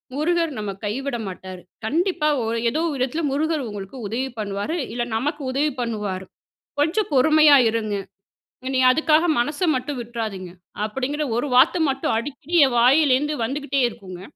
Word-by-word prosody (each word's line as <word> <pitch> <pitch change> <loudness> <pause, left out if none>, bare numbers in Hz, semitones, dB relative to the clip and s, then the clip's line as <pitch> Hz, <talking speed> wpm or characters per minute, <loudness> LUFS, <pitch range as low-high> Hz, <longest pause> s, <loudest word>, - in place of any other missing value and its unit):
"முருகர் 330 +2 +1
நம்ம 210 -1 -3
கைவிட 255 +5 -2
மாட்டாரு. 185 -1 -8 0.2
கண்டிப்பா 330 - 0 0.2
ஒ - - -2 0.2
ஏதோ 305 +7 -1
ஒரு 295 - -3
விதத்துல 265 +6 -1
முருகர் 305 0 0
உங்களுக்கு 205 +3 -8
உதவி 250 +6 -2
பண்ணுவாரு 205 - -3 0.2
இல்ல 240 0 -1
நமக்கு 295 +5 -3
உதவி 290 +3 +1
பண்ணுவாரு. 210 -5 -3 0.6
கொஞ்சம் 340 +8 +1
பொறுமையா 305 +2 +6
இருங்க. 220 -2 -2 0.8
நீங்க 260 -1 +4
அதுக்காக 315 +2 +3
மனச 290 +8 -2
மட்டும் 255 +1 -3
விட்றாதீங்க." 220 -6 -5 0.4
அப்படிங்கிற 270 +7 -2
ஒரு 245 - -1
வார்த்த 255 +7 +5
மட்டும் 270 -4 -1
அடிக்கடி 290 +7 -5
என் 260 -3 -1
வாயிலேருந்து 280 +3 +4
வந்துகிட்டே 275 +2 -2
இருக்குங்க. 185 -5 -10
265 Hz, 140 wpm, -22 LUFS, 225-300 Hz, 0.8 s, பொறுமையா